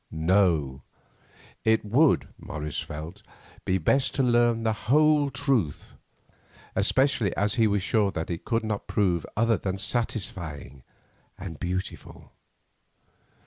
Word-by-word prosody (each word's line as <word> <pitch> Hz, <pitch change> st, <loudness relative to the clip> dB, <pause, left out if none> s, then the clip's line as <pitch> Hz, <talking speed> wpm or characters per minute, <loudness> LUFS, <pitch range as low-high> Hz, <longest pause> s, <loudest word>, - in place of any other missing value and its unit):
No; 80 Hz, -5 st, +1 dB, 0.8 s
it 110 Hz, -1 st, +2 dB
would, 135 Hz, +8 st, +3 dB
Morris 75 Hz, -1 st, -5 dB
felt, 80 Hz, +7 st, -7 dB, 0.4 s
be 95 Hz, -, +2 dB
best 130 Hz, -, +1 dB
to 135 Hz, -, +2 dB
learn 120 Hz, -2 st, +3 dB
the 110 Hz, -1 st, +1 dB, 0.2 s
whole 150 Hz, 0 st, +4 dB
truth, 125 Hz, -, -1 dB, 0.8 s
especially 120 Hz, 0 st, +1 dB
as 105 Hz, +2 st, +1 dB
he 115 Hz, -3 st, +3 dB
was 100 Hz, -2 st, 0 dB
sure 105 Hz, -1 st, +2 dB
that 80 Hz, -2 st, -4 dB
it 85 Hz, -, -5 dB
could 115 Hz, -1 st, -1 dB
not 105 Hz, -2 st, -3 dB
prove 90 Hz, -5 st, 0 dB
other 115 Hz, 0 st, +3 dB
than 95 Hz, -1 st, -3 dB
satisfying 90 Hz, -, -4 dB, 0.6 s
and 85 Hz, -4 st, -8 dB
beautiful. 90 Hz, +2 st, -5 dB
105 Hz, 120 wpm, -26 LUFS, 85-120 Hz, 0.8 s, whole